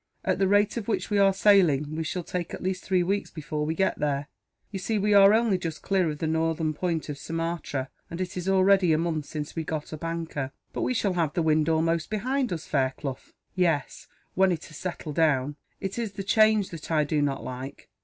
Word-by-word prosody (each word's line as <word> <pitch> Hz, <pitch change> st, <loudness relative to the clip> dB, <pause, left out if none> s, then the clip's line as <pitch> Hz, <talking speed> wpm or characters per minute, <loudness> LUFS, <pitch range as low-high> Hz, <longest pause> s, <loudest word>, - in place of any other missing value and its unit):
At -, -, +1 dB
the 195 Hz, -, +3 dB
rate 205 Hz, +3 st, +3 dB
at 225 Hz, -, -4 dB
which 225 Hz, -, -1 dB
we 205 Hz, -, +3 dB
are 195 Hz, -1 st, +6 dB
sailing, 175 Hz, -8 st, +3 dB
we 160 Hz, -, -2 dB
shall 175 Hz, +3 st, -3 dB
take 175 Hz, 0 st, -4 dB
at -, -, -10 dB
least 185 Hz, 0 st, -2 dB
three 185 Hz, -2 st, +2 dB
weeks 200 Hz, +3 st, -1 dB
before 150 Hz, -1 st, -4 dB
we 160 Hz, -, -1 dB
get 190 Hz, +2 st, 0 dB
there. 145 Hz, 0 st, -1 dB, 0.4 s
You 195 Hz, -, -4 dB
see, 215 Hz, +4 st, -1 dB
we 210 Hz, +1 st, +2 dB
are 200 Hz, 0 st, +8 dB
only 220 Hz, -4 st, +3 dB
just 165 Hz, -3 st, -5 dB
clear 190 Hz, -4 st, +2 dB
of 150 Hz, -, -4 dB
the 160 Hz, -, -3 dB
northern 160 Hz, 0 st, 0 dB
point 165 Hz, 0 st, -2 dB
of 145 Hz, -2 st, -6 dB
Sumatra; 165 Hz, -5 st, -3 dB, 0.2 s
and 170 Hz, -, -6 dB
it 185 Hz, -1 st, -3 dB
is 180 Hz, +1 st, -2 dB
already 190 Hz, -2 st, +4 dB
a -, -, +3 dB
month 160 Hz, -3 st, -2 dB
since 150 Hz, -1 st, -5 dB
we 165 Hz, -, -2 dB
got 155 Hz, 0 st, -4 dB
up 155 Hz, -, -7 dB
anchor." 165 Hz, -5 st, -3 dB, 0.2 s
"But -, -, -3 dB
we 255 Hz, -, 0 dB
shall 200 Hz, -4 st, +1 dB
have 165 Hz, -4 st, 0 dB
the 170 Hz, -, 0 dB
wind 155 Hz, 0 st, +2 dB
almost 165 Hz, 0 st, +1 dB
behind 250 Hz, +4 st, -1 dB
us, 165 Hz, -2 st, -4 dB
Fairclough." 135 Hz, -1 st, -1 dB, 0.3 s
"Yes, 170 Hz, -7 st, 0 dB, 0.3 s
when 190 Hz, 0 st, +4 dB
it 170 Hz, -2 st, -3 dB
has 155 Hz, -, -11 dB
settled 170 Hz, -4 st, -5 dB
down. 145 Hz, -3 st, +2 dB, 0.2 s
It 195 Hz, +4 st, -4 dB
is 220 Hz, -4 st, -3 dB
the 195 Hz, -, -5 dB
change 215 Hz, 0 st, +3 dB
that 165 Hz, -3 st, -8 dB
I 155 Hz, -2 st, +3 dB
do 150 Hz, 0 st, 0 dB
not 140 Hz, -1 st, -1 dB
like. 130 Hz, +2 st, -7 dB
165 Hz, 225 wpm, -27 LUFS, 155-195 Hz, 0.4 s, are